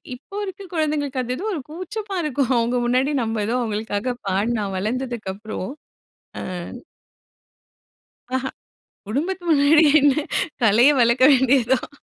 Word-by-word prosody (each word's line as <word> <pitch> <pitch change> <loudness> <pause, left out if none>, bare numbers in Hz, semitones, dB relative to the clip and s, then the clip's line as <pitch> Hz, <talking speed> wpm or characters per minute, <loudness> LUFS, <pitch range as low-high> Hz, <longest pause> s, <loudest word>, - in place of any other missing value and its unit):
இப்போ 295 +10 -14
இருக்க 385 +1 -8
குழந்தைங்களுக்கு 295 -4 -1
அது 250 0 -3
ஏதோ 400 - -5
ஒரு 310 - -3
கூச்சமா 385 +5 -6
இருக்கும். 275 -3 0
அவங்க 235 +2 +1
முன்னாடி, 255 +4 +2
நம்ம 225 -1 -2
ஏதோ 230 - -1
அவங்களுக்காக 220 +1 -2
பாடி 195 +5 0
நான் 195 -2 -3
வளர்ந்ததுக்கப்புறம். 215 -2 -4 0.7
ஆ. - - -5 1.9
அஹ, 260 0 -1 0.6
குடும்பத்துக்கு 345 - -2
முன்னாடி 300 +2 +5 0.2
என்ன 285 -1 +4 0.5
கலைய 230 +5 +6
வளர்க்க 235 +2 +4
வேண்டியது 260 -2 +3
தான். 255 - -2
255 Hz, 125 wpm, -22 LUFS, 225-295 Hz, 1.9 s, கலைய